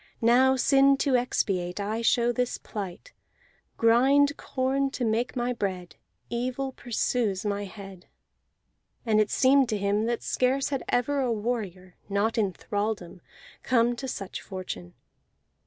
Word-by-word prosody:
Now, 255 +3 +5
sin 275 +1 +4
to 275 -1 +1
expiate, 190 -7 -1
I 215 +3 -2
show 235 +1 +3
this 250 0 -1
plight: 205 - -7 0.6
Grind 270 +5 +4
corn 270 0 -1
to 260 -2 -3
make 230 +4 -1
my 245 0 -1
bread. 185 -6 -4 0.3
Evil 255 +3 -3
pursues 230 -5 -1
my 205 0 -1
head." 195 -2 -11 1.0
And 215 -2 +3
it 210 - 0
seemed 270 -1 +4
to 215 - 0
him 200 +2 0
that 235 0 -2
scarce 265 +2 0 0.2
ever 275 +3 +1
had 260 - 0
a - - 0
warrior, 205 -5 -4
not 205 +3 0
in 200 -3 +1
thraldom, 205 -3 -4 0.4
come 240 -1 +2
to 265 - -5
such 195 -6 -5
fortune. 180 - -7
230 Hz, 140 wpm, -27 LUFS, 200-255 Hz, 1.0 s, Now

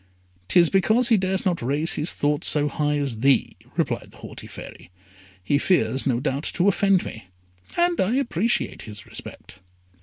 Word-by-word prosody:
"'Tis 170 - +4
because 220 +6 +3
he 230 - +5
dares 190 0 0
not 180 -3 0
raise 145 +7 +1
his 155 +3 -1
thoughts 145 0 0
so 150 -1 +4
high 150 0 -1
as 135 -6 -3
thee," 135 +2 +2 0.2
replied - - -2
the - - -18
haughty - - -10
Fairy. - - -11 0.5
"He 140 +10 +1
fears, 135 -8 +1
no 120 -3 +1
doubt, 140 +2 -2
to 180 +2 +2
offend 195 -1 +2
me, 110 -4 -9 0.5
and 345 0 +2
I 210 +6 +1
appreciate 235 - -1
his 105 -2 -10
respect." 95 - -11
155 Hz, 170 wpm, -23 LUFS, 135-195 Hz, 0.5 s, he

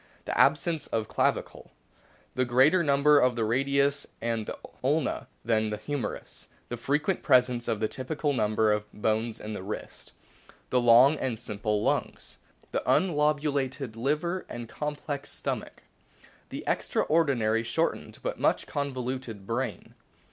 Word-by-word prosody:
The - - -3
absence 165 -4 +2
of 110 -2 -2
clavicle. - - -1 0.6
The 130 - +1
Greater 135 +9 +4
lenp 140 -2 +2
th 150 -2 +7
of 125 -1 +3
the 115 -2 0
radius 140 +4 +1
and 115 -2 -2
the - - -5 0.3
ulna 145 +2 0 0.2
than 110 -1 +2
o - - -1
o - - -2
the 105 - -3
humerus. 125 0 -5 0.2
The 120 - -4
frequent 150 - 0
presence 125 -3 +3
of 110 - 0
the 110 - +1
typical 145 +5 -2
number 110 -2 +2
of 105 0 -3
bones 110 +1 -1
in 110 0 -6
wrist. 105 - -7 0.6
The 125 - +3
long 120 +5 +7
and 125 -5 -2
simple 105 -2 -2
lungs. - - -2 0.3
The - - 0
unlobulated 145 - +1
liver 150 +9 -1
and 120 -1 -6
complex 150 +1 -4
stomach. - - -5 0.7
The - - -6
extraordinarily 125 -9 +1
shortened, 115 - -2
but - - -3
much - - +2
convoluted, 130 -6 -4
brain. 115 +1 -3
130 Hz, 140 wpm, -28 LUFS, 115-145 Hz, 0.7 s, th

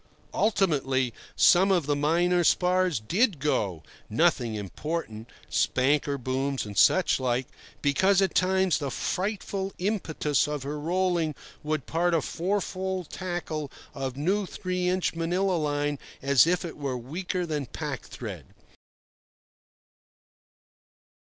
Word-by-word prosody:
Ultimately 135 - +1 0.2
some 190 +2 +5
of 175 -6 +2
the 145 0 +1
minor 175 +4 +2
spars 180 -3 +2
did 185 - +1
go—nothing 115 - 0
important: 110 - -5 0.2
spanker 140 +2 +1
booms 135 +1 -2
and 105 -1 -8
such 185 - +4
like—because 140 +8 0
at 195 -1 +2
times 190 -1 +2
the 140 -3 -2
frightful 195 - -2
impetus 175 -8 0
of 150 -2 -3
her 145 +2 -4
rolling 170 -1 0 0.3
would 150 -3 -2
part 170 +1 +1
a 160 - +2
fourfold 190 -1 -2
tackle 175 -5 -4 0.2
of 135 -2 -4
new 190 +7 0
three 180 0 -2
inch 185 0 0
Manilla 175 +3 0
line 145 -1 -1 0.2
as 140 +1 +5
if 180 +1 +1
it 165 - -7
were 140 -3 -2
weaker 175 +8 -3
than 150 -5 -3
pack - - -5
thread. - - -8
160 Hz, 115 wpm, -27 LUFS, 140-185 Hz, 0.3 s, some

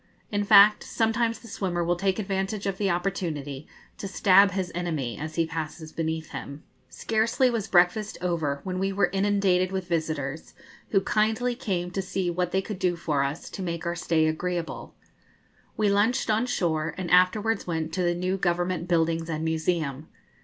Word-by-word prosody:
In 205 -1 0
fact, 205 0 +7
sometimes 225 0 0
the 230 - -14
swimmer 180 -4 -2
will 175 +1 +1
take 190 +1 0
advantage 195 0 -2
of 195 -1 -2
the 200 -2 +1
opportunity 165 -6 -3 0.3
to 195 - -4
stab 195 +1 +5
his 185 -1 -3
enemy 160 -9 -2
as 155 +2 -6
he 165 - +2
passes 160 0 -6
beneath 160 -1 -3
him. 140 +2 -7 0.3
Scarcely 230 +3 +1
was 225 -3 -2
breakfast 180 +4 +2
over 160 -6 -1
when 185 -1 -3
we 195 +1 0
were 195 -2 +1
inundated 195 -2 +2
with 190 -2 -3
visitors, 155 -3 -3 0.3
who 195 - +3
kindly 220 +5 +1
came 185 -8 -3
to 195 - -2
see 185 -1 -2
what 180 0 -1
they 190 0 +1
could 205 -2 -6
do 180 -3 +1
for 155 -4 -1
us 140 +3 -4
to - - -6
make 170 -2 -4
our 170 0 -1
stay 165 -2 +1
agreeable. 170 +2 -3 0.8
We 215 - +2
lunched 210 +4 +2
on 220 +4 +1
shore, 160 -8 -1
and 185 -2 -4
afterwards 195 +4 +3
went 160 -2 -2
to 185 - -1
the 175 -1 +1
new 185 +2 -1
Government 175 -1 -1
buildings 165 -1 +1
and 160 0 -2
museum. 160 -3 -1
180 Hz, 175 wpm, -26 LUFS, 165-200 Hz, 0.8 s, fact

